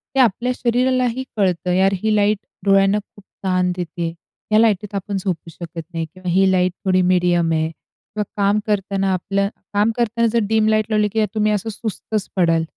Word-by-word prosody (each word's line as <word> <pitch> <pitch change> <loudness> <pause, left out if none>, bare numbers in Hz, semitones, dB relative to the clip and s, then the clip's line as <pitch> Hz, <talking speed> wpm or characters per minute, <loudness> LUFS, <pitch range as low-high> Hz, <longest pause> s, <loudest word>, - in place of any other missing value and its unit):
ते 270 - +2
आपल्या 245 +1 +3
शरीरालाही 255 +1 +1
कळतं, 180 -2 +1
यार 190 +1 +3
ही 215 -1 +2
लाईट 210 0 +3 0.3
डोळ्यांना 195 +1 +4
खूप 205 -1 -17 0.2
ताण 185 -1 +1
देते. 170 -1 -4 0.4
या 215 - +5
लाईटीत 210 -2 +1
आपण 200 +1 -3
झोपू 180 -3 -3
शकत 165 0 -8
नाही 165 -1 -2
किंवा 180 +3 -8
ही 190 +1 +4
लाईट 185 -1 +2
थोडी 185 -1 +3
मीडियम 175 -2 +2
आहे 160 0 +1
किंवा 210 +6 -8 0.2
काम 200 +1 +3
करताना 195 -1 0
आपलं 200 +2 0 0.2
काम 210 +2 +3
करताना 235 0 +1
जर 235 - +3
डीम 220 -1 +3
लाईट 215 -1 +2
लावली 210 -1 +2
की 220 -1 +2
तुम्ही 215 0 +2
असं 210 +2 -1
सुस्तच 215 -1 -4
पडाल. 165 -3 +3
200 Hz, 180 wpm, -20 LUFS, 180-215 Hz, 0.4 s, या